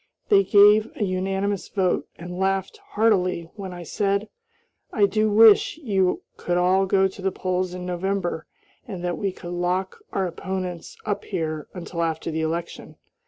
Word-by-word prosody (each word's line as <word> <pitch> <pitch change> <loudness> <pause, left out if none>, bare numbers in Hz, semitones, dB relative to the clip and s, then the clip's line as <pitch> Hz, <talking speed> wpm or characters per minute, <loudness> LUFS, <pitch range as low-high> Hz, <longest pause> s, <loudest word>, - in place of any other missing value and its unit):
They 400 -2 +6
gave 210 - +6
a 225 - 0
unanimous 195 +1 -1
vote, 185 -3 0
and 180 +1 -7
laughed 190 0 0
heartily 185 -6 0
when 195 -3 -6
I 175 -1 -8
said, 200 +4 -1 0.6
"I 210 -5 +4
do 215 +2 +1
wish 215 +5 +6
you 195 - 0
could 175 0 -1
all 185 +2 +3
go 190 0 +3
to 190 +1 -11
the 190 0 0
polls 185 0 -2
in 180 0 -6
November 180 -2 -2 0.4
and 190 -6 -6
that 175 -1 -2
we 200 -2 -1
could 175 -1 -9
lock 180 +2 -1
our 190 - 0
opponents 180 -1 -5
up 205 -2 -2
here 155 -5 -3
until 175 -1 -5
after 165 0 -2
the 160 0 -2
election." 165 +2 -4
190 Hz, 165 wpm, -24 LUFS, 175-200 Hz, 0.6 s, They